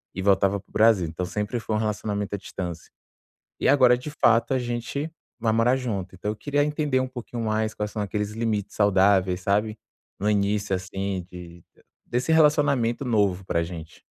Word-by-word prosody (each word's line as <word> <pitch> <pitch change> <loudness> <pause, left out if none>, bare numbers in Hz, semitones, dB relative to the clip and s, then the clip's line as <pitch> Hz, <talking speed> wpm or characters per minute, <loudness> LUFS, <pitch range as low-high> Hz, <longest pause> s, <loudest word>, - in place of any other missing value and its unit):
e 95 - -3
voltava 100 0 +3
para 100 - -21
o - - -25
Brasil, 110 -6 +4
então 80 +3 -4
sempre 105 +5 -3
foi 110 - -4
um - - +2
relacionamento 105 -1 -2
à - - 0
distância. 90 -3 -7 0.7
E - - +1
agora 125 -3 +5
de 130 +4 -7
fato 115 -3 +3
a - - +2
gente 120 +5 -3 0.3
vai 110 -1 +1
morar 115 +3 +3
junto. 100 -8 -4
Então 100 +3 -4
eu 105 - -4
queria 145 +5 0
entender 150 -2 0
um 130 - -2
pouquinho 120 -2 -6
mais 110 0 -1
quais 105 0 -3
são 110 - -4
aqueles 105 +1 -2
limites 110 -3 -2
saudáveis, 95 -2 +3
sabe. 105 +3 0 0.4
No 105 +2 +1
início, 100 0 +1
assim, 95 0 -4
de 85 -1 -11 0.4
desse 125 +6 0
relacionamento 145 -6 +3
novo 100 -6 +1
pra 85 -2 0
gente. 80 -1 -8
105 Hz, 180 wpm, -25 LUFS, 95-120 Hz, 0.7 s, agora